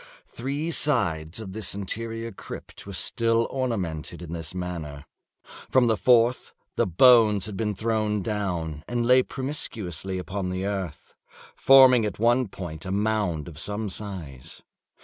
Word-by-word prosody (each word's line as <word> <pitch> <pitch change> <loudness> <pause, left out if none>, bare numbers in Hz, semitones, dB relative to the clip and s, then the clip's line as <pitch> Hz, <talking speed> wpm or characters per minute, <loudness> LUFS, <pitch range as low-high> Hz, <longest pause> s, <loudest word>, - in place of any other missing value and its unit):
Three 140 +7 -4
sides 90 - 0
of 100 -4 -7
this 105 -2 -4
interior 115 +3 -4
crypt - - -10
were - - -7
still 115 0 +1
ornamented 90 - -3
in 85 -1 -7
this 80 0 -5
manner. 80 -5 -5 0.6
From 130 -2 +4
the 115 -2 +3
fourth 120 +2 +3 0.2
the - - +1
bones 105 +1 +5
had 105 -2 -6
been 105 0 -2
thrown 110 -1 0
down, 90 -7 -3
and 120 -1 -1
lay 125 +1 +6
promiscuously 105 - -3
upon 95 +1 -4
the 95 +1 -3
earth, 95 -6 -5 0.4
forming 130 -3 +7
at 105 - -3
one 120 +3 +3
point 85 -5 -8
a 95 - -5
mound 100 -6 0
of 80 -4 -9
some 105 +3 -3
size. 85 -9 -7
105 Hz, 145 wpm, -25 LUFS, 90-115 Hz, 0.6 s, forming